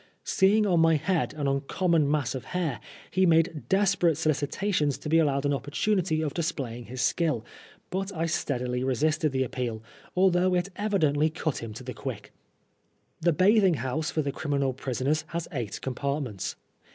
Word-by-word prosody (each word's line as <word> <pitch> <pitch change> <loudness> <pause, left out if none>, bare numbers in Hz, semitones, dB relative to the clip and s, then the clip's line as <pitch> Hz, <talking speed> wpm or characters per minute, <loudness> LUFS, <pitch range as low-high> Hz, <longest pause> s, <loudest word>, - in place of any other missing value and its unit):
Seeing 210 +3 +3
on 180 -4 +3
my 165 0 +5
head 165 +1 0
an 150 -2 -3
uncom 140 +6 0
mon 155 -4 +4
mass 150 -2 0
of 130 -1 -6
hair, 160 - -2 0.3
he 190 -1 +3
made 165 +1 +4
many 155 - -8
desperate 190 -5 +3
solicitations 155 0 0
to 150 - -6
be 165 +1 +5
allowed 140 -3 +1
an 145 - +2
opportunity 160 - 0
of 150 - -2
displaying 135 -9 -3
his 125 +2 -4
skill, 150 -10 +1 0.5
but 195 +1 -2
I 165 -3 -2
steadily 125 -6 -1
resisted 150 +4 +1
the 130 0 +1
appeal, 120 -3 -4 0.3
although 185 0 +3
it 180 +2 0
evidently 160 -8 +2
cut 155 -2 -2
him 115 -1 -6
to 130 - -8
the 125 0 -6
quick. 115 -7 -7 0.9
The 170 +1 +3
bathing 190 +2 +4
house 130 +4 -2
for 155 - -1
the 140 - -1
criminal 140 -2 -1
prisoners 135 +4 -1
has 170 -1 -2
eight 115 -7 -4
compartments. 135 -5 -3
155 Hz, 170 wpm, -27 LUFS, 135-175 Hz, 0.9 s, my